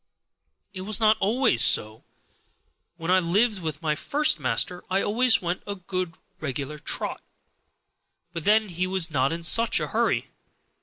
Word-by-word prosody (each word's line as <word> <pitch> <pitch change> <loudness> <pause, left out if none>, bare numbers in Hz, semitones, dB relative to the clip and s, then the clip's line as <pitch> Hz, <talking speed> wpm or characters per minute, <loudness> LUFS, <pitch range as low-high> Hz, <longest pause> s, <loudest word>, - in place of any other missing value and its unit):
It 185 - -7
was 205 +1 +1
not 220 -1 +4
always 215 - +2
so; 110 -3 +2 0.9
when 165 +1 -3
I 185 - +5
lived 200 +4 +1
with 155 -1 -5
my 155 -1 +1
first 290 - 0
master 140 +7 0
I 190 +1 0
always 230 0 +2
went 175 +1 -3
a 200 - -4
good 185 -2 -5 0.2
regular 145 +1 -5
trot, - - -4 1.1
but 165 -2 -5
then 215 +2 +3
he 180 +1 -2
was 185 -3 +1
not 135 -1 +1
in 165 +1 -5
such 230 +7 +4
a - - -4
hurry. - - -1
180 Hz, 155 wpm, -25 LUFS, 155-210 Hz, 1.1 s, I